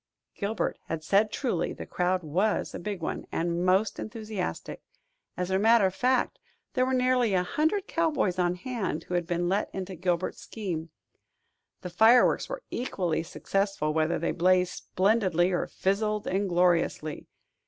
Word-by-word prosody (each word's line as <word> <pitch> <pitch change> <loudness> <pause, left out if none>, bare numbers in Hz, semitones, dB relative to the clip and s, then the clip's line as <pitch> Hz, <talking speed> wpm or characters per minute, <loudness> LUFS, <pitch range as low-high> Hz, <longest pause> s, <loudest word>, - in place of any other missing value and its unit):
Gilbert 210 +2 -2
had 160 -1 -4
said 205 +6 +3
truly: 235 - -1
the - - -8
crowd 180 0 0
was 185 +8 0
a - - -5
big 200 0 -5
one, - - -3
and 170 +1 -1
most 190 +4 +2
enthusiastic. 215 -4 -5 0.6
As 180 +1 -2
a 190 - +2
matter 225 0 +5
of 185 - +1
fact, 255 +4 +1 0.3
there 255 -1 +2
were 260 - 0
nearly 250 -4 +2
a 180 - +2
hundred 315 - 0
cowboys 300 - 0
on 175 0 +2
hand 225 +1 -3
who - - -7
had 175 -1 0
been 175 0 0
let 195 +3 0
into 190 0 -4
Gilbert's 180 0 -2
scheme. 175 -7 -5 0.9
The 180 - -6
fireworks 225 +7 +5
were - - -5
equally 180 -10 -1
successful 185 -1 -1
whether 160 +2 +1
they - - -1
blazed 180 +1 +2
splendidly 190 -3 +1
or 175 - 0
fizzled 210 +2 -1
ingloriously. 175 -5 +1
190 Hz, 155 wpm, -28 LUFS, 175-220 Hz, 0.9 s, matter